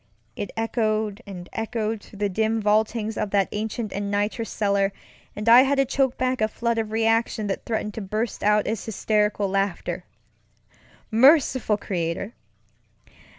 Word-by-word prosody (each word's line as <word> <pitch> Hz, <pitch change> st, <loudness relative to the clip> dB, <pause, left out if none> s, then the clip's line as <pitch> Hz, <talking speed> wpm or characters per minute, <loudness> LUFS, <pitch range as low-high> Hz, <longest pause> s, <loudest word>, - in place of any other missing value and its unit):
It 205 Hz, -, -4 dB
echoed 220 Hz, -2 st, -1 dB
and 180 Hz, -3 st, -8 dB
echoed 225 Hz, -1 st, -2 dB
through 205 Hz, -, -15 dB
the 205 Hz, 0 st, 0 dB
dim 220 Hz, +3 st, 0 dB
vaultings 215 Hz, +1 st, +1 dB
of 210 Hz, -, -1 dB
that 195 Hz, -1 st, +2 dB
ancient 215 Hz, 0 st, -3 dB
and 200 Hz, 0 st, -3 dB
nitrous 205 Hz, +3 st, -1 dB
cellar, 200 Hz, -1 st, +1 dB, 0.4 s
and 210 Hz, +2 st, -5 dB
I 235 Hz, +2 st, +9 dB
had 275 Hz, +1 st, +2 dB
to 275 Hz, -, +4 dB
choke 265 Hz, -1 st, 0 dB
back 255 Hz, -1 st, 0 dB
a 215 Hz, -, +4 dB
flood 235 Hz, +1 st, -1 dB
of 220 Hz, -1 st, -3 dB
reaction 225 Hz, 0 st, +1 dB
that 195 Hz, -, -3 dB
threatened 215 Hz, -2 st, -2 dB
to 220 Hz, -, -5 dB
burst 215 Hz, +3 st, -3 dB
out 210 Hz, 0 st, +3 dB
as 220 Hz, -1 st, -2 dB
hysterical 210 Hz, -1 st, 0 dB
laughter. 195 Hz, -1 st, -2 dB, 1.1 s
Merciful 260 Hz, -2 st, +4 dB
Creator! 180 Hz, +2 st, -3 dB
215 Hz, 150 wpm, -24 LUFS, 205-225 Hz, 1.1 s, I